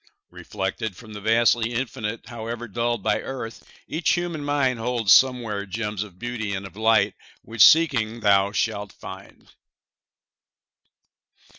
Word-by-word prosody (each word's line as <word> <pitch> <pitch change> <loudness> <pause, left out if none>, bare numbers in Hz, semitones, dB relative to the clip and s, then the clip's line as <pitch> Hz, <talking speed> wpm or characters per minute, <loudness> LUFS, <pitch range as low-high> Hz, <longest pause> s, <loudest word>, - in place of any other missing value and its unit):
Reflected 95 +1 -4
from 110 -3 -12
the 105 - -8
vastly 115 +2 +2
Infinite, 115 -3 -4
However 120 0 -6
dulled 120 0 -2
by - - +1
earth, 125 -4 -7 0.2
each 160 +1 0
human 175 -3 -2
mind 140 -4 0
Holds 115 -3 +3
somewhere 120 -6 +3
gems 105 0 -3
of 100 -4 -8
beauty 110 -2 -4
and 95 +1 -5
of 100 - -11
light 110 +1 +3 0.3
Which, 115 -1 -3
seeking, 115 -3 +5
thou 100 -1 +3
shalt 105 -2 -2
find. 95 +1 -12
115 Hz, 130 wpm, -24 LUFS, 105-120 Hz, 0.3 s, seeking